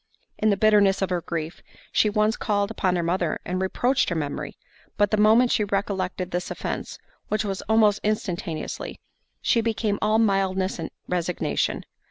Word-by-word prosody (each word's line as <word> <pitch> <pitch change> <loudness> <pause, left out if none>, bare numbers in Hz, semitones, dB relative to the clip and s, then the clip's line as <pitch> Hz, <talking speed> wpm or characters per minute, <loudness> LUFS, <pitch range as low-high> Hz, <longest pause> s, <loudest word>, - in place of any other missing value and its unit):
In 215 - +3
the 200 - +2
bitterness 200 -2 +4
of 190 - -2
her 175 -1 0
grief, 165 -1 -5 0.3
she 215 - +3
once 215 +1 +2
called 205 -1 0
upon 185 -4 0
her 175 - 0
mother, 170 -1 0
and 185 +1 -2
reproached 245 +7 +1
her 170 - -2
memory—but 150 +6 -4
the - - +4
moment 220 +4 +5
she 215 - +2
recollected 195 -3 -2
this 175 +1 -2
offence, - - -4 0.3
(which 215 +1 -1
was 195 -2 -3
almost 215 -2 +4
instantaneously) 190 -6 -3 0.4
she 230 - +3
became 220 -2 -1
all 215 +1 +3
mildness 195 -4 +1
and 160 - -4 0.2
resignation. 180 -1 -1
200 Hz, 160 wpm, -25 LUFS, 180-215 Hz, 0.4 s, moment